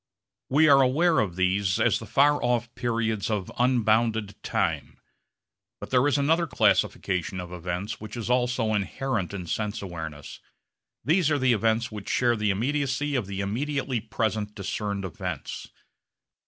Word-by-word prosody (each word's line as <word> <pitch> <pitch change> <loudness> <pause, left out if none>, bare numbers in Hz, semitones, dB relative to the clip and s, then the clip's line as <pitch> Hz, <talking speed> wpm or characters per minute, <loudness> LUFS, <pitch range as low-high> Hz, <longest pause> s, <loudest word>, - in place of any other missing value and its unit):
We 150 +4 +5
are 140 -2 +7
aware 155 +6 +3
of 95 -5 -1
these 95 +1 +1
as - - +3
the 110 - -9
far 145 +6 +3
off 120 -1 0
periods 110 -4 -1
of 105 -4 -2
unbounded 110 -4 +2
time. - - -2 0.8
But - - -9
there 130 +2 +4
is 145 - +2
another 165 +4 +2
classification 95 - +1
of 90 -1 -7
events 90 +5 -4
which 110 +2 -7
is 115 - -4
also 125 -2 +1
inherent 105 0 -2
in 95 -3 -5
sense 105 +5 -2
awareness. 80 -6 -7 0.7
These 160 +2 +3
are 145 - +2
the 130 -3 +3
events 115 +1 +1
which 105 -2 -7
share 120 -1 +2
the 105 -1 0
immediacy 140 +6 0
of 125 -8 -1
the 100 0 -4
immediately 130 +5 -2
present 110 -1 -2
discerned 100 0 -3
events. 90 - -5
110 Hz, 150 wpm, -26 LUFS, 100-130 Hz, 0.8 s, are